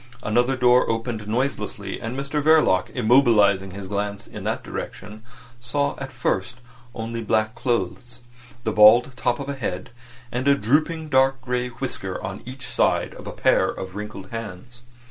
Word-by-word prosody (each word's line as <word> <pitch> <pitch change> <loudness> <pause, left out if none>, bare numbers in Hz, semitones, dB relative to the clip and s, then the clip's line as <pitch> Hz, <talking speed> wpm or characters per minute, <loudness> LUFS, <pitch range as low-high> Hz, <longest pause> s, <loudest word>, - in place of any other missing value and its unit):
Another 120 +5 +2
door 125 0 +4
opened 115 -1 -3
noiselessly, 105 -4 -3
and 115 +3 -4
Mr 140 +2 -2
Verloc 155 -12 +4
immobilising 110 -6 +4
his 100 0 -7
glance 100 +1 -3
in - - -9
that - - -2
direction 105 +1 -7 0.4
saw 140 +4 -1
at 135 -1 -6
first 120 -3 -1 0.4
only 115 0 -4
black 110 0 +1
clothes, 120 0 -2 0.4
the - - 0
bald 110 +5 +7
top 120 -1 0
of 140 - -5
a 140 - -2
head, 100 -7 -4 0.4
and 125 +3 -2
a 140 - +6
drooping 155 +7 0
dark 135 -1 +3
grey 125 -1 -1
whisker 115 -6 -4
on 95 0 -5
each 130 0 -8
side - - +1
of - - -11
a - - -4
pair - - +2
of 95 0 -6
wrinkled 105 -2 -7
hands. 115 +2 -8
120 Hz, 160 wpm, -23 LUFS, 105-130 Hz, 0.4 s, bald